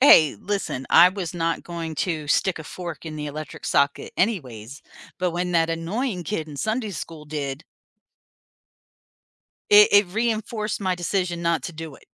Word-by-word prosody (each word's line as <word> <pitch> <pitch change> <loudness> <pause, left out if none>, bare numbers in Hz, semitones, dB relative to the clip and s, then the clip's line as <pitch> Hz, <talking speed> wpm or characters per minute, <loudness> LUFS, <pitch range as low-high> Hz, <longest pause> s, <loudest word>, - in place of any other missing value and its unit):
Hey, 160 - +7
listen, 195 -10 -3
I 180 +1 +8
was 185 -3 -5
not 165 -1 -1
going 165 -2 -5
to 155 -4 -2
stick 185 +5 +1
a 160 - -8
fork 170 -2 -7
in 155 - -5
the 150 0 -4
electric 155 +1 -7
socket 140 0 +1
anyways, 135 - -2 0.4
but 180 -1 +1
when 180 +1 -2
that 165 -1 +3
annoying 180 +4 -2
kid 160 -6 -3
in 145 - -9
Sunday 220 - -1
school 160 -3 -7
did 145 -1 -4 2.1
it 210 0 +9
it 205 -1 +6
reinforced 220 +1 -2
my 185 -2 0
decision 175 -1 -2
not 165 -5 +1
to 180 - -5
do 160 -3 -8
it. - - -21
170 Hz, 165 wpm, -24 LUFS, 155-195 Hz, 2.1 s, it